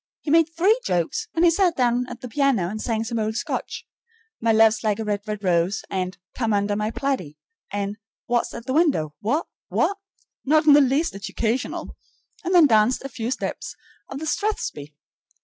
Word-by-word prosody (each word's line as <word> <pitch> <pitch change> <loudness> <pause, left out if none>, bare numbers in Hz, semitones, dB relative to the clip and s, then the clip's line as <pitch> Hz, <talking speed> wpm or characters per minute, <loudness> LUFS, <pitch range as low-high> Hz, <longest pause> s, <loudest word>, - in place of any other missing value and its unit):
He 295 - -3
made 330 0 +5
three 375 +8 +2
jokes, 180 - -1
and 330 +1 +4
he 340 - +6
sat 355 -1 +2
down 245 0 +1
at - - -9
the 250 - -6
piano 255 -7 +1
and 215 +2 -5
sang 225 -2 -1
some 230 0 -3
old 220 0 -1
Scotch, - - -4 0.5
"My 225 0 +2
luve's 220 0 +4
like 210 -2 +1
a 225 - -3
red, 205 -1 -1
red 210 -1 -4
rose," 180 +2 +1
and 185 -1 -2 0.2
"Come 225 -4 0
under 205 0 +1
my 210 +1 -1
plaidie," 225 - -3 0.3
and 205 +1 -3 0.3
"Wha's 240 -1 0
at 235 - -8
the 260 - -2
window? 280 - +2
Wha? 275 +10 0 0.3
Wha?" - - +1 0.5
not 310 +3 +3
in 300 - +8
the 290 - +7
least 280 +5 +1
educational, 225 +4 -3 0.5
and 365 +1 0
then 340 -3 +8
danced 220 0 +3
a 275 - -5
few 230 -3 -4
steps 265 - -4 0.3
of 270 - -6
the 315 - -5
strathspey! 300 - -3
235 Hz, 190 wpm, -23 LUFS, 210-295 Hz, 0.5 s, in